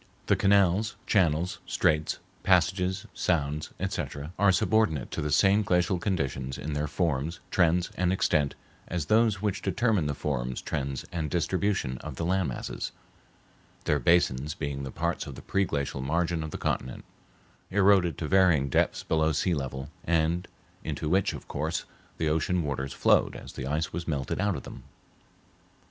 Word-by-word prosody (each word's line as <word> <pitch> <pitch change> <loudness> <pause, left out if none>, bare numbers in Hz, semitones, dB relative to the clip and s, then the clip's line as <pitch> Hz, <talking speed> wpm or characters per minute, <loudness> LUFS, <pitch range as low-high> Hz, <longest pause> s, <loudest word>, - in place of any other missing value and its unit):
The - - +3
canals, 100 +2 +3
channels, 90 -3 +2
straits, 75 0 +1 0.2
passages, 95 +1 +2
sounds, 75 -3 -1
etc., 75 +4 -4
are 100 -1 +5
subordinate 95 - +1
to - - -3
the 75 - -1
same 95 +7 +4
glacial 90 -2 +1
conditions 70 -9 -2
in 75 +1 -4
their 75 +1 -1
forms, 80 0 -1
trends, 85 0 +2
and 90 0 +2
extent 75 -6 +1 0.3
as 85 -3 -2
those 110 +1 +3
which 100 -2 -1
determined 105 -10 +1
the 70 - -1
forms, 65 -4 -2
trends, 70 -3 -3
and 80 -3 -2
distribution 90 -5 0
of - - -7
the 85 - -3
land 95 0 +1
masses, - - -5 0.9
their 75 - +1
basins 75 -2 +2
being 70 -2 -3
the 70 - -5
parts - - -2
of - - -7
the - - -11
pre 100 0 +1
glacial 70 -4 -2
margin 85 +4 0
of 80 - -4
the - - -5
continent, 65 - -3 0.6
eroded 95 -5 +4
to 80 - -3
varying 85 -7 +4
depths - - +1
below 80 0 +2
sea 85 +4 +1
level, 70 -1 -4
and 85 +1 +1 0.4
into 75 - -3
which, 95 +3 +2
of - - -9
course, 80 +3 -2 0.3
the 80 - 0
ocean 80 +3 +1
waters 70 -2 -3
flowed - - +3
as - - -9
the 65 - -5
ice 75 +2 -1
was 85 +1 -4
melted 70 +2 -2
out 100 -2 +1
of - - -6
them. - - -9
80 Hz, 160 wpm, -28 LUFS, 75-95 Hz, 0.9 s, are